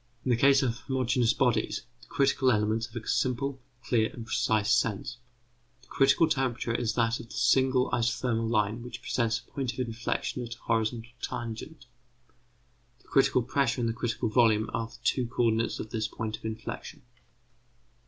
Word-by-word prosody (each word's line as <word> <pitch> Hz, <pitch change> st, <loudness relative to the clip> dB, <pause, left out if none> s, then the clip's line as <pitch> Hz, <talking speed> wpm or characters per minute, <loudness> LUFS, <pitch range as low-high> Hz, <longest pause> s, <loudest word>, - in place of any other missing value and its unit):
In 130 Hz, -, +1 dB
the -, -, +5 dB
case 135 Hz, +3 st, +5 dB
of 120 Hz, -2 st, -1 dB
homogeneous 125 Hz, -3 st, +1 dB
bodies 120 Hz, -5 st, +1 dB, 0.2 s
the -, -, -17 dB
critical 135 Hz, -1 st, +2 dB
elements 110 Hz, +1 st, +1 dB
have 120 Hz, -1 st, -7 dB
a -, -, -14 dB
simple, 130 Hz, +2 st, 0 dB, 0.2 s
clear, 110 Hz, -3 st, +2 dB
and 115 Hz, -, -8 dB
precise 110 Hz, -1 st, +1 dB
sense; 115 Hz, 0 st, 0 dB, 0.7 s
the -, -, -21 dB
critical 140 Hz, +4 st, +4 dB
temperature 130 Hz, -5 st, -1 dB
is 115 Hz, -2 st, 0 dB
that 115 Hz, 0 st, +1 dB
of 120 Hz, -, -9 dB
the -, -, -11 dB
single 130 Hz, 0 st, +3 dB
isothermal 115 Hz, -1 st, 0 dB
line 110 Hz, 0 st, +1 dB
which 120 Hz, +1 st, -8 dB
presents 115 Hz, -2 st, 0 dB
a -, -, -28 dB
point 135 Hz, -4 st, -2 dB
of -, -, -10 dB
inflexion 120 Hz, +1 st, -2 dB
at 120 Hz, 0 st, -6 dB
a -, -, -23 dB
horizontal 115 Hz, +1 st, -1 dB
tangent; 120 Hz, +5 st, -6 dB, 1.2 s
the -, -, -24 dB
critical 130 Hz, -2 st, +3 dB
pressure 130 Hz, 0 st, 0 dB
and 120 Hz, -, +1 dB
the 115 Hz, -, 0 dB
critical 120 Hz, 0 st, -2 dB
volume 110 Hz, -1 st, +3 dB
are 115 Hz, -, -1 dB
the -, -, -15 dB
two 125 Hz, -3 st, +1 dB
co 120 Hz, 0 st, -1 dB
ordinates 115 Hz, 0 st, +1 dB
of 110 Hz, -, -6 dB
this 110 Hz, -2 st, -1 dB
point 110 Hz, -1 st, -4 dB
of -, -, -15 dB
inflexion. 110 Hz, 0 st, -6 dB
120 Hz, 175 wpm, -28 LUFS, 115-130 Hz, 1.2 s, the